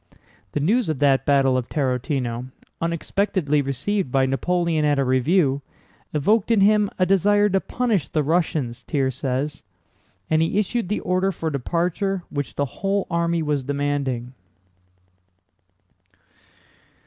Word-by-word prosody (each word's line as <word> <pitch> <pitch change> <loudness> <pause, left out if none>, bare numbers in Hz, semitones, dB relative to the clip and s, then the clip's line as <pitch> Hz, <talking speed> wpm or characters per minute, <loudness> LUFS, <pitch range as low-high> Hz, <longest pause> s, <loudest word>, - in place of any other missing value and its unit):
The - - 0
news 210 - +1
of 155 - -1
that 135 -2 +2
battle 135 -2 +4
of 125 - -7
Tarútino, 125 -3 -1 0.3
unexpectedly 170 -2 0
received 140 - -2
by 135 0 +3
Napoleon 165 +4 0
at 145 -1 +2
a 140 - +2
review, 135 +2 +2 0.5
evoked 195 +10 +2
in 225 -4 +4
him 210 0 +4
a 185 - +3
desire 205 +2 +3
to 195 0 +2
punish 225 - -1
the 155 - 0
Russians 150 -6 0
(Thiers 130 +1 -1
says), 135 +4 -3 0.7
and 160 0 +2
he 165 +4 0
issued 210 -1 -1
the 210 - -1
order 185 +1 +1
for 165 -3 -3
departure 175 - -1
which 145 -1 -4
the 145 - 0 0.2
whole 195 0 +1
army 170 -1 0
was 150 -2 0
demanding. 140 -3 -2
155 Hz, 135 wpm, -23 LUFS, 135-190 Hz, 0.7 s, battle